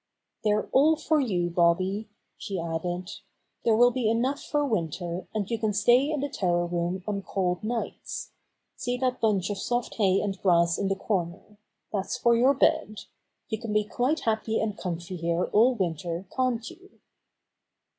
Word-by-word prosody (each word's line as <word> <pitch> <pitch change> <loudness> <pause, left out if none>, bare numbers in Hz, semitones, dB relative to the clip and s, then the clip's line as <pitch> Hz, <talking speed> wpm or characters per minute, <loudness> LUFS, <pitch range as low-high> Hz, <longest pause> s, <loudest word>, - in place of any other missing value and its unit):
^They're 210 0 +1
all 300 +4 +5
for 315 0 +1
you, 180 -10 0
Bobby," 185 +5 +1 0.3
she 195 -4 -5
added. 175 +3 -3 0.5
"There 225 - +4
will 245 +2 +6
be 245 -3 0
enough 255 +5 0
for 295 -1 0
winter, 175 - -2
and 210 -3 -2
you 230 0 -2
can 215 -2 0
stay 245 +7 +4
in 305 -3 -1
the 285 - 0
tower 175 -9 0
room 175 +1 -2
on 200 -1 -1
cold 180 -2 -1
nights* 230 +2 -4 0.4
See 245 0 -2
that 255 -1 -1
bunch 205 -3 +1
of 200 - -4
soft 240 0 -2
hay 195 -3 +3
and 195 -2 -3
grass 170 -2 +3
in 200 - 0
the 195 - +1
corner. 195 +1 -3 0.3
That's 200 +4 -2
for 235 -1 +4
your 260 +4 +4
bed. 215 -5 +1 0.5
You 220 - -2
can 225 -3 -4
be 210 0 +3
quite 255 +8 0
happy 220 0 0
and 215 -2 -1
comfy 180 -1 -5
here 170 +1 0
all 245 +4 +4
winter, 170 -2 -2
can't 250 -3 0
you?" 380 +8 -14
210 Hz, 170 wpm, -27 LUFS, 180-240 Hz, 0.5 s, will